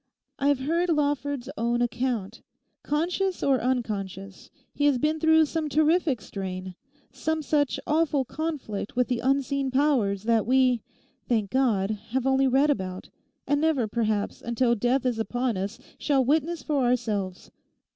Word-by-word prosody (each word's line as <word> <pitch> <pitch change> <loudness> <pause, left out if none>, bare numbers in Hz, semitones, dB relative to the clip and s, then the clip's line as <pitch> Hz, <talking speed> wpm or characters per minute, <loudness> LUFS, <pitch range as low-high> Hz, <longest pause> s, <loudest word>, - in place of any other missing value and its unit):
I 280 - +1
have 285 -2 +2
heard 335 +6 0
Lawford's 285 -4 0
own 235 +1 +1
account. 240 -4 -2 0.4
Conscious 355 +5 -1
or 270 -2 +2
unconscious, 200 -6 -3 0.2
he 290 - 0
has 285 -3 +4
been 305 +5 0
through 320 0 +5
some 310 0 -3
terrific 310 - +2
strain, 185 -1 -6 0.4
some 315 0 -2
such 290 -1 +1
awful 300 -3 +1
conflict 275 -8 -4
with 250 +1 +1
the 245 -2 0
unseen 275 +1 0
powers 255 -8 +1
that 225 -1 +2
we—thank 245 -4 0
God!—have 225 0 0
only 270 0 +3
read 275 +3 +3
about, 185 -7 -4 0.4
and 290 +1 +1
never 305 -8 +2
perhaps, 215 -2 -1
until 235 +1 +1
death 245 +4 +1
is 245 -3 0
upon 245 +1 -1
us, 195 +4 -4 0.2
shall 275 -3 +2
witness 315 +5 0
for 285 -3 0
ourselves. 215 -7 -1
260 Hz, 140 wpm, -26 LUFS, 225-290 Hz, 0.4 s, through